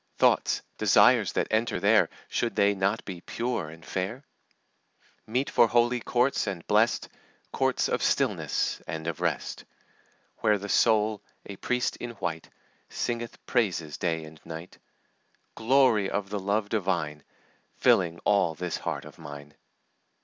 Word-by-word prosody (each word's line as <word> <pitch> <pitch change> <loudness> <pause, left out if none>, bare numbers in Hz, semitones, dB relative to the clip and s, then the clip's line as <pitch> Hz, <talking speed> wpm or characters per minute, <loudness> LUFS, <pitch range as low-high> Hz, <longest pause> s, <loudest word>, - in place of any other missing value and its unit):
Thoughts, - - +3 0.2
desires, - - +5
that - - 0
enter 110 +2 +1
there, - - +4 0.2
Should 120 - -1
they 100 0 +4
not 100 +3 -1
be 90 -4 -7
pure 115 -9 -3
and 80 +1 -13
fair? 100 +9 -3 1.0
Meet 125 +5 -1
for 120 - +5
holy 120 +1 +2
courts 125 0 +1
and 95 -4 -4
blest, - - +2 0.5
Courts - - +1
of - - -1
stillness - - 0
and 80 0 -5
of 85 -2 -4
rest, - - -2 0.7
Where 105 -2 +2
the 100 +1 -7
soul, 110 -1 +3 0.2
a 100 - -7
priest 125 +4 -1
in 120 -1 -6
white, 85 -6 -4 0.4
Singeth 120 -1 -4
praises 90 - 0
day 80 -2 -1
and 80 0 -13
night; 80 +2 -9 0.7
Glory 115 -4 +3
of 100 -1 -3
the 105 - -2
love 100 +2 -1
divine, 85 -8 -1 0.5
Filling 85 -2 +3
all 95 -6 +3
this 90 +1 -3
heart - - -4
of - - -13
mine." 75 0 -10
100 Hz, 140 wpm, -27 LUFS, 85-115 Hz, 1.0 s, desires